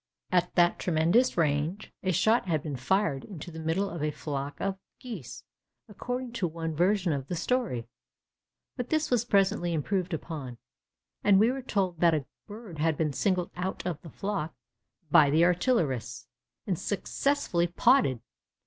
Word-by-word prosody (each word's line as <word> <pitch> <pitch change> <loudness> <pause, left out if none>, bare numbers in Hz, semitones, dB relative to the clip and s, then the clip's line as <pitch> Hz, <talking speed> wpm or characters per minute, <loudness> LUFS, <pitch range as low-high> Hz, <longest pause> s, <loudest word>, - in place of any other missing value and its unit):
At 180 -1 +1
that 175 -1 +4
tremendous 175 +9 +2
range, 155 +5 0
a 185 - 0
shot 220 +4 +3
had 155 -5 0
been 150 -3 -4
fired 140 +2 0
into 175 -4 -8
the 160 - -8
middle 165 +5 0
of 170 -4 -6
a 150 - +1
flock 145 -1 -5
of 195 -1 -2 0.2
geese, 155 - -8 0.4
according 245 +4 -4
to 205 -7 -1
one 165 -1 -4
version 180 0 +2
of 135 -2 -4
the 175 - -3
story; 180 - -1 0.9
but 250 -2 -4
this 310 -2 0
was 240 -2 +3
presently 195 -5 +2
improved 185 +4 -1
upon, 150 -6 -5 0.7
and 195 -2 +6
we 225 +4 +5
were 270 +1 -4
told 190 -8 -1
that 170 -1 +5
a 145 -4 -2 0.2
bird 205 -6 -9
had 160 -1 +1
been 155 -3 0
singled 185 +2 0
out 185 +1 -4
of 170 -4 -3
the 165 - -10
flock 195 -3 -3 0.6
by 145 -2 +7
the 160 +4 +4
artillerists 175 - 0 0.4
and 185 -5 -1
successfully 205 -3 0
'potted. 175 - +3
175 Hz, 160 wpm, -28 LUFS, 155-205 Hz, 0.9 s, by